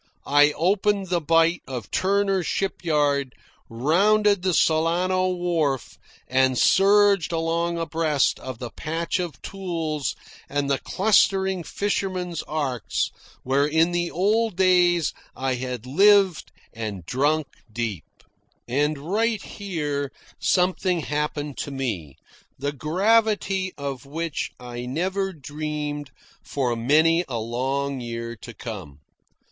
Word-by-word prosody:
I 145 +1 +5
opened 195 +3 +1
the 175 -1 +1
bight 165 +2 +3
of 125 -6 -6
Turner's 195 -1 +1
Shipyard, 145 -8 0 0.3
rounded 200 - +3
the 185 0 +1
Solano 175 +4 +2
wharf, 170 -7 -1 0.3
and 130 0 +2
surged 200 -1 +4
along 170 +1 0
abreast 160 -4 +1
of 130 -3 -7
the 120 -1 -6
patch 165 +3 -2
of 175 -3 -4
tules 165 -7 -3 0.3
and 140 0 -1
the 135 - +1
clustering 190 -2 +2
fishermen's 185 -3 -2
arks 130 - -1 0.3
where 140 +3 +2
in 160 +3 +3
the 175 0 0
old 215 +4 +1
days 180 -3 +4 0.2
I 130 0 -1
had 125 -2 -4
lived 195 +4 +4 0.2
and 105 -6 -5
drunk 145 - +1 0.3
deep. 110 -6 -3 0.6
And 145 +5 +1
right 210 +8 0
here 150 -8 -3 0.3
something 180 -1 +1
happened 150 -1 -3
to - - -3
me, 110 - -4 0.4
the 140 +2 -2
gravity 195 - +1
of 140 -2 -5
which 165 +1 -3
I 120 0 -7
never 190 +8 -1
dreamed 150 -1 -5 0.3
for 125 -4 -1
many 155 +8 +3
a 125 -3 -3
long 135 +4 -2
year 115 0 -5
to 115 +2 -11
come. 95 - -7
155 Hz, 115 wpm, -24 LUFS, 135-185 Hz, 0.6 s, I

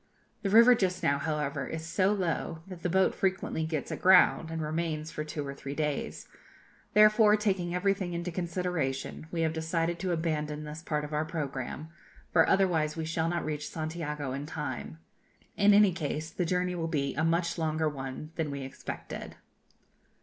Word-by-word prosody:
The 200 - -1
river 230 +4 +8
just 185 -5 0
now, 140 0 +2
however, 145 -3 -2
is 160 0 -5
so 185 +3 +2
low, 165 -4 -2
that 185 -3 -9
the 175 - -1
boat 190 +2 +3
frequently 185 -4 -1
gets 155 -3 -3
aground, 180 -3 +5
and 165 0 -4
remains 155 0 -2
for 150 - -4
two 150 -1 -5
or 140 - -5
three 140 0 -7
days; 150 -2 -2 0.7
therefore, 215 0 +7
taking 190 -4 0
everything 190 -1 0
into 170 +1 -3
consideration, 170 -5 -2
we 170 - -1
have 160 -1 +1
decided 165 +1 -1
to 185 -2 -1
abandon 155 -2 -1
this 150 +1 -7
part 150 -3 -2
of 150 - -8
our 150 +1 +1
programme, 150 -1 -4 0.4
for 165 -2 +5
otherwise 165 -5 +2
we 160 - -2
shall 160 0 0
not 175 0 -1
reach 150 -1 -3
Santiago 155 -4 -4
in 140 +2 -4
time. 80 - -5 0.6
In 205 0 +5
any 205 -1 +6
case, 155 0 -3
the 180 - -1
journey 180 +1 0
will 165 -2 -2
be 140 -4 -1
a 160 - -1
much 170 +1 +1
longer 160 0 0
one 135 +1 -5
than 160 -3 -1
we 140 -1 -4
expected. 130 - -7
160 Hz, 175 wpm, -30 LUFS, 150-180 Hz, 0.7 s, river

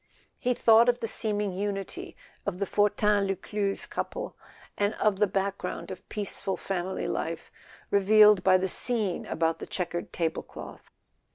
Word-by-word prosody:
He 250 0 +1
thought 230 +1 +6
of 245 0 +2
the 230 - -2
seeming 210 -2 -1
unity 195 +1 -4 0.3
of 190 -3 -1
the 200 - -1
Fortin 205 0 +2
Lus 195 -1 -1
cluze 200 +1 -2
couple, - - -4 0.4
and 205 +1 0
of 210 -2 +1
the 210 - +4
background 195 -1 -3
of 185 0 -10
peaceful 200 -2 -3
family 190 -1 -3
life - - -3 0.4
revealed 210 0 +6
by 185 -1 +6
the 185 +1 -1
scene 215 -1 -1
about 165 0 0
the - - -7
checkered 175 -1 -3
table¬ 165 -1 -2
cloth. - - -10
200 Hz, 155 wpm, -28 LUFS, 190-210 Hz, 0.4 s, thought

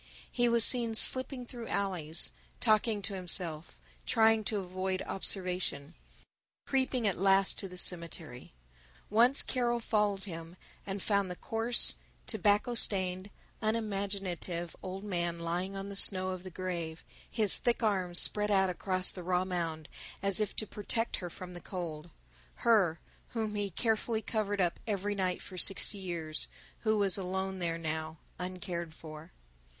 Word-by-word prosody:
He 240 -1 +2
was 235 -1 +5
seen 235 -3 +5
slipping 255 +2 +5
through 235 -2 -8
alleys, 165 - 0 0.3
talking 215 -1 +2
to 195 - -4
himself, 175 -3 -1 0.3
trying 225 0 +4
to 215 - -1
avoid 185 0 -3
observation, 180 -6 -1 0.7
creeping 260 -3 0
at 195 -5 0
last 195 0 +4
to 195 - -3
the 180 -1 -10
cemetery. 165 -8 -4 0.6
Once 240 +5 +5
Carol 240 -2 0
followed 210 -3 0
him 165 -2 -8 0.3
and 195 0 -4
found 200 -2 +1
the 180 - -5
coarse, 225 - +2 0.3
tobacco 210 - +1
stained, 185 -4 +1 0.3
unimaginative 195 -5 -2
old 190 +1 -6
man 175 -4 -2
lying 175 +3 -3
on 195 +1 -5
the 200 - -7
snow 185 -1 +3
of 185 -1 -4
the 185 - -8
grave, 170 -3 -5 0.3
his 215 -4 +6
thick 240 0 0
arms 185 -5 +1
spread 210 +2 +5
out 190 -2 +3
across 185 0 0
the 185 - -7
raw 180 +1 0
mound 165 -4 -3 0.4
as 195 0 +4
if 210 -2 -1
to 215 - -1
protect 220 +3 -1
her 175 - -6
from 180 +1 -9
the 175 - -9
cold, 170 -3 -6 0.6
her 195 -9 +4 0.4
whom 220 -2 -1
he 205 -1 -1
had 195 - -9
carefully 220 0 0
covered 205 -2 -2
up 175 -2 +1
every 205 -1 -1
night 185 -2 -2
for 185 -2 -8
sixty 195 +2 +3
years, 165 -4 -3 0.3
who 220 -1 +1
was 200 -1 +4
alone 190 +1 -3
there 165 -2 -2
now, 160 0 -4 0.2
uncared 180 -3 -5
for. 155 +1 -11
190 Hz, 150 wpm, -31 LUFS, 175-210 Hz, 0.7 s, his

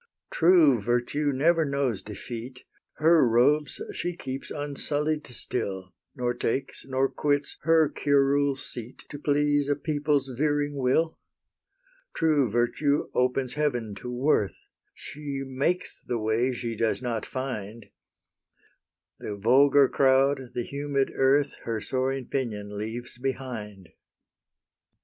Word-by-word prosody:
True 160 - +5
Virtue 120 +6 0
never 160 +5 +3
knows 140 -8 -1
defeat: 120 +4 -8 0.3
HER 160 -4 +4
robes 145 +6 +2
she 175 0 -3
keeps 135 -3 -6
unsullied 150 +1 -2
still, 95 -5 -4 0.2
Nor 125 -2 -1
takes, 120 +2 -3
nor 135 0 +1
quits, 145 +1 -1
HER 160 -1 +4
curule 140 -1 +2
seat 120 -2 -8
To 145 - -7
please 145 0 +1
a 145 - +3
people's 145 -2 0
veering 145 +1 0
will. 140 +5 +1 1.0
True 150 -6 +2
Virtue 120 +6 +1
opens 125 0 +1
heaven 125 -8 -1
to 125 - -6
worth: 125 -5 +1 0.4
She 145 -2 -6
makes 140 +7 -2
the 120 - -2
way 110 +3 +1
she 120 -2 -4
does 115 +3 0
not 115 -3 -2
find: 115 -5 -6 1.3
The 105 - -5
vulgar 135 +6 +5
crowd, 135 -1 +2
the 120 - -1
humid 140 0 -1
earth, 140 +2 +2
Her 115 -2 -2
soaring 130 +3 -2
pinion 105 -7 -3
leaves 115 +3 -6
behind. 120 -8 -5
135 Hz, 115 wpm, -27 LUFS, 120-145 Hz, 1.3 s, True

